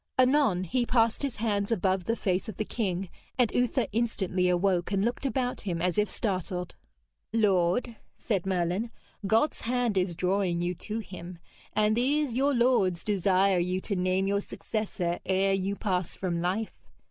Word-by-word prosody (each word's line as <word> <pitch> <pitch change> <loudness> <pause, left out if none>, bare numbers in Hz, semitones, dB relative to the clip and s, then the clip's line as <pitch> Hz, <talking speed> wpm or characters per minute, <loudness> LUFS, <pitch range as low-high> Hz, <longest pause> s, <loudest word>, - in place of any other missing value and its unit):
Anon 255 -8 +3
he 245 +7 0
passed 230 -2 +2
his 275 -4 -2
hands 205 -1 -1
above 190 -3 +1
the 230 - +1
face 190 -2 -1
of 210 - -8
the 215 - -1
king, 190 -5 -2 0.3
and 245 -4 +3
Uther 245 0 +1
instantly 190 -5 0
awoke, 180 0 +1
and 200 +1 +1
looked 240 +4 -1
about 255 -2 -1
him 175 -5 -3
as 180 0 0
if 210 - +1
startled. 185 -3 -3 0.6
'Lord,' 210 +2 +2 0.2
said 195 -5 -2
Merlin, 185 +4 0 0.4
'God's 225 +8 +2
hand 240 -4 +1
is 180 -2 -1
drawing 180 0 0
you 175 +1 -1
to 215 +5 -5
Him, 180 -3 -9 0.4
and 215 +1 +3
these 270 +1 +1
your 275 +2 +2
lords 220 -8 +2
desire 195 -2 +3
you 180 +1 0
to 200 - -2
name 185 +1 +1
your 200 +1 +1
successor 195 -6 -3
ere 195 +1 +2
you 195 +1 -1
pass 185 -4 -1
from 175 -3 -2
life. 190 +5 -2
195 Hz, 165 wpm, -28 LUFS, 180-230 Hz, 0.6 s, Anon